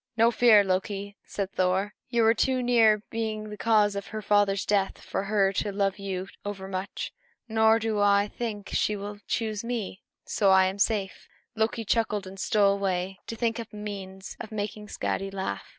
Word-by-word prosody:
"No 230 +1 +5
fear 225 -2 +6
of - - -2
that, 190 - +2
Loki," 200 +1 -3
said 195 -1 -3
Thor; 190 +2 0 0.2
"you 235 -2 +2
were 225 0 +6
too 255 +2 +1
near 225 -4 +4
being 215 -2 -3
the - - -5
cause 210 -2 +3
of 200 - -4
her 215 -1 -6
father's 200 -1 +2
death 200 -2 +1
for 195 - -4
her 200 -1 +2
to 205 +1 -1
love 195 0 0
you 190 -1 -4 0.2
overmuch. 195 -1 -5 0.4
Nor 220 0 +4
do 220 -2 -1
I 205 0 +4
think 210 -3 -5
that - - +1
she 210 - +1
will 205 0 -6
choose 220 -1 -2
me; 230 -5 -4 0.2
so 200 -3 +2
I 190 0 +6
am 190 +2 -2
safe." 200 -2 0 0.3
Loki 225 +1 0
chuckled 210 -2 0
and 190 +1 -10
stole 200 -1 +3
away 190 -1 -2
to 230 - -4
think 230 0 -1
up 230 -1 -7
a - - -12
means 195 -2 -7
of 220 - -8
making 210 0 -4
Skadi 195 -1 -2
laugh. 195 -1 -4
205 Hz, 195 wpm, -27 LUFS, 195-220 Hz, 0.4 s, fear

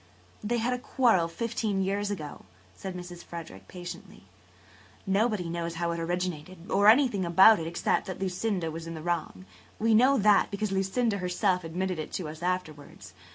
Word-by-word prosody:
" 90 - -29
"They 235 +3 0
had 240 +2 0
a 250 - -3
quarrel 230 -10 +2
fifteen 215 +1 -2
years 200 +2 -1
ago," 155 -8 -6 0.3
said 190 -2 -7
Mrs. 175 -1 -8
Frederick 125 - -9
patiently. 175 -1 -9 0.8
"Nobody 200 -2 +1
knows 170 0 -3
how 170 0 -1
it 170 - -3
originated 175 0 -4
or 200 +1 +4
anything 225 -4 +5
about 190 +5 +7
it 160 - -4
except 170 - 0
that 185 - -5
Lucinda 185 -2 -2
was 165 +1 -7
in 165 - -6
the 155 - -8
wrong. 165 - -3 0.3
We 225 +1 +2
know 255 +5 +5
that, 210 -2 +4
because 200 0 -3
Lucinda 200 +3 0
herself 180 0 0
admitted 180 +1 -3
it 155 - -5
to 180 - -3
us 155 +1 -9
afterwards. 155 - -4
185 Hz, 175 wpm, -28 LUFS, 170-205 Hz, 0.8 s, about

